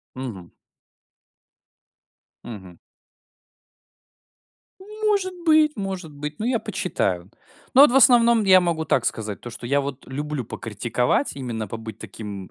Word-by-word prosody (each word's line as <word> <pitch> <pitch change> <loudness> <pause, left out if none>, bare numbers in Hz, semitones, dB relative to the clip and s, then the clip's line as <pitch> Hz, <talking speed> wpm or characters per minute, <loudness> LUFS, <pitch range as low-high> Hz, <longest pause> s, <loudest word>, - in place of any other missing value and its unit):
Мгм. 110 -10 -7 1.9
Мгм. 95 -6 -10 2.0
Может 415 -2 -1
быть 310 -1 +5
может 190 -5 -5
быть, 150 +1 -7
но 220 - -3
я 245 -2 +1
почитаю. 95 - -2 0.4
Но 270 - +9
вот 290 - +7
в - - +3
основном 235 -3 +6
я 185 -1 +7
могу 165 -2 -1
так 130 -4 +1
сказать, 105 -3 -3
то 120 - -8
что 120 +1 -8
я 140 +2 +2
вот 140 -1 -6
люблю 145 -1 -4
покритиковать, 120 - -1
именно 115 -5 -4
побыть 110 +1 -8
таким, 100 -2 -8
140 Hz, 125 wpm, -23 LUFS, -, 2.0 s, Но